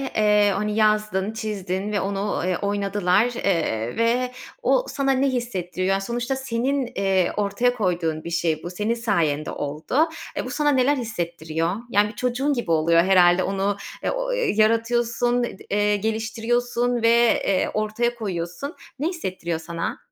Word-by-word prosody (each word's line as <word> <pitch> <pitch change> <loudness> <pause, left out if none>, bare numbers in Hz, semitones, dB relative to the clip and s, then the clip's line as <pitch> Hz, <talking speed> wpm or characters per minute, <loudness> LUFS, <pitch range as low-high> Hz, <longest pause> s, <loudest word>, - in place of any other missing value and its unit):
Eee, 210 -1 +4
hani 210 +1 -1
yazdın, 215 -2 +1
çizdin 205 -3 -3
ve 205 - 0
onu, 195 0 -2
ııı, 180 0 0
oynadılar, 200 0 +1
eee, 120 - -1
ve 245 +2 +1 0.3
o - - +2
sana 275 -1 0
ne 270 +1 +2
hissettiriyor? 190 -7 -2
Yani 195 0 +1
sonuçta 240 +5 -2
senin, 265 +1 -1
eee, 190 -2 +2
ortaya 210 +4 +1
koyduğun 170 -8 -1
bir - - -5
şey 165 -2 0
bu, 175 - -4
senin 210 +5 -1
sayende 165 -11 0
oldu. 155 - 0 0.3
Eee, - - -2
bu - - -5
sana 295 +4 +1
neler 270 +1 +3
hissettiriyor? 170 -6 -2
Yani 210 -2 +3
bir 215 - -11
çocuğun 250 +5 0
gibi 240 -10 -2
oluyor 165 +1 +4
herhâlde 180 -1 +5
onu, 195 +1 -1 0.3
e, - - 0
o - - -2
yaratıyorsun, 240 - +1
d 240 - -4
eee, 205 0 +2
geliştiriyorsun 235 +3 -1
ve, 230 0 +4
eee, 190 -2 +2
ortaya 215 +3 0
koyuyorsun. 195 - -4 0.2
Ne 300 - 0
hissettiriyor 185 - -3
sana? 165 +1 -4
210 Hz, 150 wpm, -23 LUFS, 185-240 Hz, 0.3 s, herhâlde